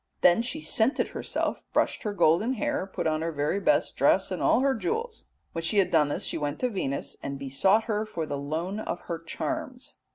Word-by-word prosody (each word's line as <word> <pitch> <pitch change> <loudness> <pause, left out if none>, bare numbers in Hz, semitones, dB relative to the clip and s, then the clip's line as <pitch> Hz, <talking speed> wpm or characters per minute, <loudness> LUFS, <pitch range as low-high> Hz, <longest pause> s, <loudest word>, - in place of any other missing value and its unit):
Then 180 +5 +6
she 255 +6 -3
scented 240 -1 +1
herself, - - -2
brushed - - +1
her 210 - -2
golden 200 +9 +3
hair, 205 -5 -1
put - - -3
on 155 0 +1
her 165 +1 -1
very 150 +5 0
best 300 +9 +2
dress - - +3
and - - -3
all - - +4
her 275 0 +3
jewels. 450 - -3 0.3
When 165 - -3
she 165 +6 +1
had 195 - +3
done 150 -3 +4
this, - - -1
she - - -1
went 145 0 -2
to 250 - +2
Venus 140 - -3
and 140 0 -4
besought 140 +11 +2
her 215 -2 -1
for 170 -7 -3
the 145 -2 -4
loan 165 +8 -3
of 175 -5 -4
her 170 -2 -5
charms. 260 - -5
190 Hz, 215 wpm, -27 LUFS, 155-240 Hz, 0.3 s, Then